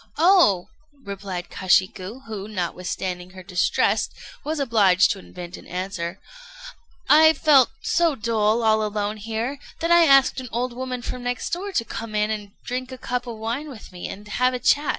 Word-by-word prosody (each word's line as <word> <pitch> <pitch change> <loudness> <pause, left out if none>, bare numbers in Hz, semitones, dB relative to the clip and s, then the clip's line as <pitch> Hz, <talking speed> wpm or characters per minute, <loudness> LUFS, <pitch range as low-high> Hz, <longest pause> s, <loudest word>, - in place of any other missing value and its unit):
"Oh!" 330 - +5 0.4
replied 195 -3 -6
Kashiku, 185 +5 +1
who, 210 -3 -6
notwithstanding 180 -2 -4
her 185 - -10
distress, 180 0 +1 0.3
was 310 +1 -2
obliged 205 -8 +4
to - - -4
invent 170 - -9
an - - -14
answer, 180 -1 -4 0.9
"I 315 +1 +7
felt 280 -4 +5
so 335 -3 +2
dull 225 -1 +1
all 220 -1 +3
alone 210 0 -2
here, 225 +6 -4 0.2
that 335 +1 -1
I 340 -1 +7
asked 275 -1 +5
an 255 -2 -7
old 245 +1 -2
woman 250 0 -5
from 250 - -5
next 245 0 -3
door 390 +4 -3
to 230 - 0
come 225 -2 -6
in 210 +1 +1
and 205 -2 -5
drink 255 +1 -4
a 260 - -7
cup 250 0 -3
of 230 -2 -6
wine 235 +7 -4
with 240 -8 -11
me, 180 -1 -7
and 205 +2 -9
have 250 +4 +1
a - - -3
chat." 290 +4 +2
225 Hz, 175 wpm, -23 LUFS, 195-260 Hz, 0.9 s, I